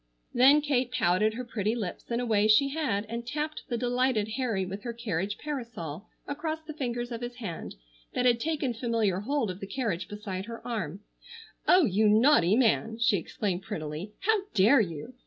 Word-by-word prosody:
Then 275 +5 +6
Kate 260 -4 0
pouted 215 -1 +2
her 250 +1 -5
pretty 220 -1 -1
lips 210 -7 -5
in 235 0 0
a 245 - -1
way 215 -2 +3
she 245 +6 +5
had 265 -9 -1
and 230 +2 -5
tapped 300 +5 -3
the 240 - -1
delighted 245 -2 +1
Harry 220 -5 -1
with 195 +2 -6
her 235 +2 -4
carriage 205 -4 -2
parasol 230 - -6 0.2
across 315 +2 -4
the 310 - -6
fingers 240 -4 -3
of 230 0 -5
his 240 0 -5
hand 205 -9 -6 0.4
that 250 - +1
had 240 -2 +4
taken 295 -3 -1
familiar 225 -5 0
hold 245 -1 -1
of 180 - -9
the 195 - -6
carriage 200 -9 -2
beside 200 -2 -5
her 230 +1 -9
arm. 200 -6 -3 0.7
"Oh, 360 -2 +6
you 210 0 +3
naughty 215 - +5
man!" 225 -2 +2
she 230 -3 +3
exclaimed 185 +2 -3
prettily. 175 -1 -5
"How 440 +1 +3 0.2
dare 220 +8 +6
you! 170 +5 -5
230 Hz, 185 wpm, -28 LUFS, 200-255 Hz, 0.7 s, Then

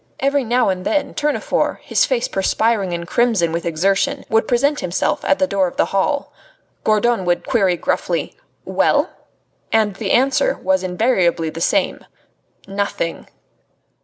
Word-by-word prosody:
Every 275 0 +1
now 245 0 +2
and 185 -1 -2
then 295 - -1
Tournefort, 300 0 0
his - - +1
face 250 -3 0
perspiring 200 0 0
and 170 0 -4
crimson 220 -7 +2
with 170 +1 -3
exertion, 195 - 0
would 225 0 +2
present 280 +4 +1
himself 185 +3 -1
at 285 - +3
the 280 - +2
door 200 -8 +1
of - - -9
the - - +3
hall. 280 +9 0 0.5
Gourdon 215 0 +2
would 175 0 0
query 195 -7 +2
gruffly: - - -2 0.3
"Well?" - - +1 0.6
And 210 -3 +1
the 200 -2 -3
answer 275 - +2
was 285 0 +1
invariably 180 -4 +1
the 165 - -7
same: - - 0 0.6
"Nothing!" 195 -4 -3
210 Hz, 145 wpm, -19 LUFS, 180-260 Hz, 0.6 s, at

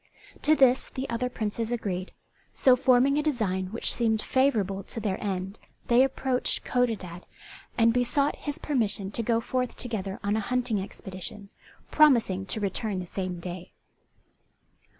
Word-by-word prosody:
To 310 - +4
this 265 -3 +4
the 265 +1 -4
other 250 +2 -1
Princes 225 0 -3
agreed; 195 -6 -3 0.4
so 260 -2 +5
forming 260 +2 +4
a - - +2
design 215 -11 -1
which 225 +5 -1
seemed 225 -2 +1
favourable 215 -7 +1
to 225 - -6
their 205 -2 -2
end 195 0 -3 0.3
they 240 +2 +6
approached 265 -1 -1
Codadad, 215 -9 -1 0.6
and 230 -1 +4
besought 265 +4 +1
his 290 -2 -4
permission 210 -8 -1
to 230 - -2
go 230 0 +1
forth 250 +1 -2
together 205 -5 -4
on 205 +1 +1
a - - +1
hunting 240 -1 -1
expedition, 190 +1 -7 0.4
promising 230 -11 +4
to 220 - -1
return 205 0 -2
the 180 - -4
same 185 0 -4
day. 180 0 -7
225 Hz, 150 wpm, -27 LUFS, 195-250 Hz, 0.6 s, they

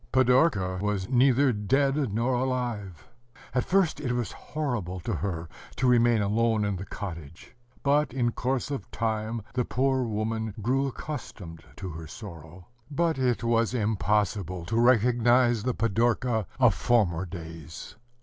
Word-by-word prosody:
Pidorka 125 - +3
was 100 -2 -1
neither 130 +1 +4
dead 135 +5 +1
nor 115 +5 0
alive. 120 -9 -2 0.5
At 125 -1 +1
first 185 -3 +2
it 125 -4 -1
was 120 -2 -2
horrible 120 - -4
to 115 - -3
her 85 -1 -3 0.3
to 130 - -1
remain 120 -3 +4
alone 110 +1 +1
in 100 -2 -1
the 95 - -7
cottage; 85 - -8 0.3
but, 145 +2 +2
in 120 -2 0
course 130 +3 -2
of 135 -9 -5
time, 110 0 -2
the 125 -1 +1
poor 130 +2 +1
woman 110 -1 -2
grew 130 +6 +1
accustomed 100 - -7
to 95 - -6
her 80 -1 -8
sorrow. 85 -4 -10 0.2
But 160 0 0
it 125 -2 +1
was 115 +1 +1
impossible 105 -5 0
to 115 +6 +1
recognize 120 0 +4
the 125 +2 -1
Pidorka 115 -1 +1
of 125 -5 +5
former 95 -8 +1
days. 80 -3 -9
115 Hz, 140 wpm, -27 LUFS, 100-125 Hz, 0.5 s, of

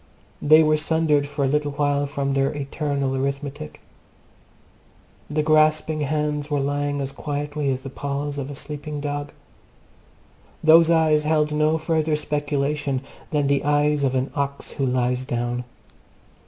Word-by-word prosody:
They 155 +2 +6
were 155 0 +3
sundered 155 -2 +1
for 145 -1 -1
a - - +2
little 145 +1 0
while 145 0 +1
from 140 -1 -2
their 135 0 +1
eternal 140 -1 -2
arithmetic. 140 +2 -4 1.5
The 150 +1 0
grasping 155 0 +3
hands 150 0 -1
were 145 -1 0
lying 145 +1 -1
as 135 0 -3
quietly 145 +1 -3
as 130 0 -2
the 135 - -7
paws 145 +1 -3
of 140 0 -4
a 145 - -6
sleeping 150 +1 -6
dog. 145 0 -4 1.3
Those 160 +1 +7
eyes 155 -2 +3
held 150 -1 +2
no 155 +1 +2
further 160 -1 0
speculation 145 -2 -1 0.3
than 150 -2 +1
the 140 0 +1
eyes 145 0 +2
of 130 -1 +1
an 130 +1 -1
ox 140 -1 -3
who 135 - -1
lies 125 0 0
down. 120 0 -2
145 Hz, 145 wpm, -23 LUFS, 140-150 Hz, 1.5 s, Those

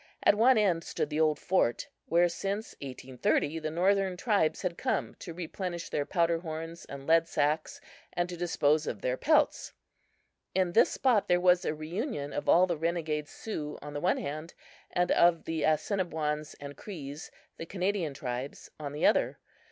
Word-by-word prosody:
At - - +6
one 235 +4 +5
end 180 -6 +2
stood 150 - -3
the 150 - -1
old 155 -2 +3
fort 175 -11 +1 0.2
where 170 +1 +4
since 200 +5 -3
1830 135 +3 -1
the 155 -1 -3
northern 190 +3 +2
tribes 200 -7 +1
had 180 -2 -1
come - - -1
to 170 - -7
replenish 175 0 -5
their 145 -1 -1
powder 170 -2 +2
horns 165 0 -6
and 140 0 -9
lead 165 +1 +4
sacks 155 0 0 0.3
and 175 0 -1
to 180 - -6
dispose 155 -3 +1
of 105 - -4
their 125 - 0
pelts. 305 - +2 0.8
In 185 -2 +2
this 220 - +5
spot 245 -6 +2
there 175 0 +4
was 180 0 +4
a 155 - 0
reunion 155 - -4
of 145 - -2
all 180 +2 +7
the 175 -3 -2
renegade 160 -2 -1
Sioux 150 -8 -5
on 145 0 -7
the 145 - -4
one 185 - +2
hand 155 +3 -5 0.3
and 180 0 +1
of 170 -1 +4
the 160 -1 -2
Assiniboines 155 -2 0
and 145 0 -8
Crees, 150 -5 -8 0.3
the 165 - -7
Canadian 185 -5 -1
tribes, 125 +1 -5
on 145 -2 -5
the 150 - 0
other. - - +3
165 Hz, 175 wpm, -30 LUFS, 150-180 Hz, 0.8 s, all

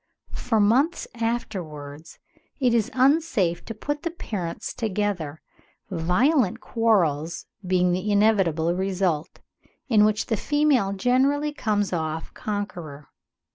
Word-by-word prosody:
For 225 -3 0
months 255 +11 +2
afterwards 170 - -5 0.4
it 250 -4 +3
is 225 -3 +2
unsafe 255 - +2
to 225 - -6
put 290 +7 -3
the 335 - -2
parents 205 - -5
together, 200 -8 -2 0.5
violent 205 - +2
quarrels 170 -8 +1 0.2
being 180 -1 +3
the 185 +4 -1
inevitable 190 -6 +3
result, 185 -4 -1 0.5
in 215 -4 +5
which 215 0 +2
the 225 - -1
female 290 -6 +2
generally 270 +8 +1
comes 205 -8 -1
off 160 -1 -3
conqueror." 175 -9 -5
205 Hz, 110 wpm, -24 LUFS, 170-240 Hz, 0.5 s, in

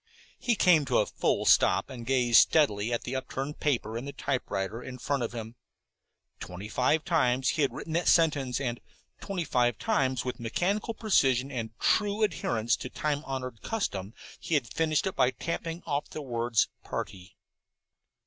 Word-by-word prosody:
He 240 - +1
came 180 -7 +5
to 130 -2 +1
a 105 - +3
full - - 0
stop - - +4
and 120 -3 -8
gazed 125 -3 +5
steadily 115 -8 +2
at 120 - -1
the 125 - -4
upturned 135 +2 -4
paper 120 -7 0
in 125 - -7
the 140 - -5
typewriter 125 -6 -3
in 125 0 -8
front 140 +1 -1
of 115 - -2
him. 115 -1 -6 0.9
Twenty 90 +4 -7
fives 150 +7 +2
times 130 -6 +2
he 155 - 0
had 140 - +2
written 160 - -6
that 170 +2 0
sentence, 145 -7 +3
and 120 -4 -2 0.4
twenty 195 -3 -3
five 120 -5 +1
times 130 -2 0
with 125 - -4
mechanical 195 - -1
precision 135 - +2
and 115 -4 -5
true 210 0 +2
adherence 120 - +1
to 130 - -6
time 150 +1 -2
honored 130 -4 -5
custom 105 - -3 0.2
he 165 - -1
had 120 -9 -1
finished 155 0 +1
it 190 - -2
by 130 -2 +4
tapping 170 +3 -4
off 145 -2 -2
the 155 - -6
word 120 -2 -3 0.3
"party." 95 0 -6
130 Hz, 170 wpm, -28 LUFS, 120-155 Hz, 0.9 s, came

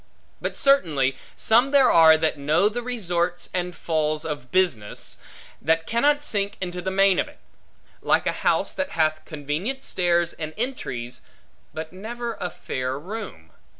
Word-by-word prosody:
But - - -3
certainly 155 - +3 0.2
some 240 +5 +3
there 275 -2 +5
are 160 -1 +7
that 160 0 +1
know 155 +8 +2
the 240 +3 -4
resorts 175 -8 -1
and 180 -1 -2
falls 155 -1 -1
of 145 -5 -5
business, 175 - 0 0.4
that 160 +2 +1
cannot 290 +6 +2
sink 205 -6 -1
into 180 -1 -4
the 190 - -2
main 195 0 +4
of - - 0
it; - - -15 0.6
like - - +2
a - - +2
house - - +1
that 285 0 -3
hath 155 -1 +1
convenient 155 - -4
stairs 175 -1 +1
and 155 -1 -6
entries, 125 - -4 0.5
but 160 +1 -7
never 235 +5 -5
a 180 - -1
fair 130 -4 -4
room. 175 - -8
175 Hz, 150 wpm, -24 LUFS, 155-220 Hz, 0.6 s, are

